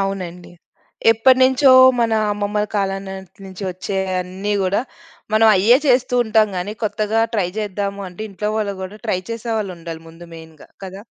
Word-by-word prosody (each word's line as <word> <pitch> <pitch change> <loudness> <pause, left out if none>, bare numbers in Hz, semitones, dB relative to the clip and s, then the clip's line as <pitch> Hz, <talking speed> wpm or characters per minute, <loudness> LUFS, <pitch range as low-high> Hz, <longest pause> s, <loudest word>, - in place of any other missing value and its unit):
అవునండి. 185 -3 -5 0.6
ఎప్పటినుంచో 260 +3 +4 0.3
మన 230 -1 +1 0.2
అమ్మమ్మల 205 +1 -2
కాలం 195 -1 -1
నాటి 190 +1 -10
నుంచి 190 +1 -10
వచ్చే 185 +2 -5 0.2
అన్ని 190 +3 -4
గూడా, 190 +3 +1 0.5
మనం 220 +1 +4
అయ్యే 225 +7 +5
చేస్తూంటాం 245 -4 +2
గానీ, 180 +4 -3
కొత్తగా 215 +1 0
ట్రై 190 -4 0
జేద్దాము 200 -1 -3
అంటే, 180 +4 -9
ఇంట్లో 210 +2 -4
వాళ్ళు 205 -2 -2
గూడా 200 +3 -8
ట్రై 185 - 0
చేసేవాళ్ళుండాలి. 195 -8 -5
ముందు 165 +1 -13
మెయిన్‌గా 160 -2 -14 0.2
కదా? 190 +2 -9
200 Hz, 140 wpm, -19 LUFS, 185-220 Hz, 0.6 s, అయ్యే